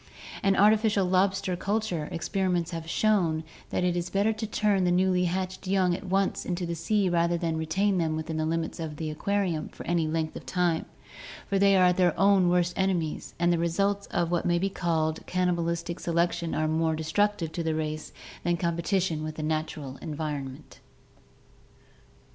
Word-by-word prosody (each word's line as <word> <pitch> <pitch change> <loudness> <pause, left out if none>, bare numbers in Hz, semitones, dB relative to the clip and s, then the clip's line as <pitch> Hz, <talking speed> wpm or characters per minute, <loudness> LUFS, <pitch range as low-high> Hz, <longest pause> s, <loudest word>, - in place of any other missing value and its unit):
In 195 0 +3
artificial 210 -1 +4
lobster 190 +1 +1
culture, 195 -5 -2
experiments 180 -1 -1
have 165 -1 -5
shown 175 -7 +2 0.3
that - - -1
it 180 -1 +1
is 175 0 -2
better 200 +4 +2
to 220 0 -4
turn 205 -2 +1
the 180 - +2
newly 180 0 +3
hatched 185 +2 -3
young 185 -2 +2
at 180 - -5
once 195 +1 +1
into 175 0 -2
the 170 - -3
sea 200 +4 +1
rather 170 -1 +2
than 165 -1 -1
retain 185 +5 +1
them 160 -2 0
within 160 0 -4
the 155 - 0
limits 165 +1 -2
of 160 -2 -4
the 155 0 -4
aquarium 180 -1 -1
for - - -10
any 170 -2 +1
length 155 0 -2
of - - -9
time, 175 -3 0 0.6
for 195 - 0
they 195 0 +5
are 180 -1 +5
their 180 -2 +2
own 195 -2 +5
worst 175 0 +2
enemies 180 -5 -1
and 175 0 +3
the 170 - 0
results 195 +4 0
of 170 -1 -1
what 175 - +1
may 175 0 +2
be 195 +3 0
called 160 -3 -1
cannibalistic 170 -2 -1
selection 170 0 0
are 155 - +1
more 160 0 +1
destructive 165 +2 0
to 170 - -3
the 160 -1 -1
race 155 -1 -3 0.3
than 175 0 +1
competition 170 0 0
with 155 0 -5
the 155 - -5
natural 155 -3 -3
environment. 145 -3 -6
175 Hz, 175 wpm, -27 LUFS, 160-190 Hz, 0.6 s, they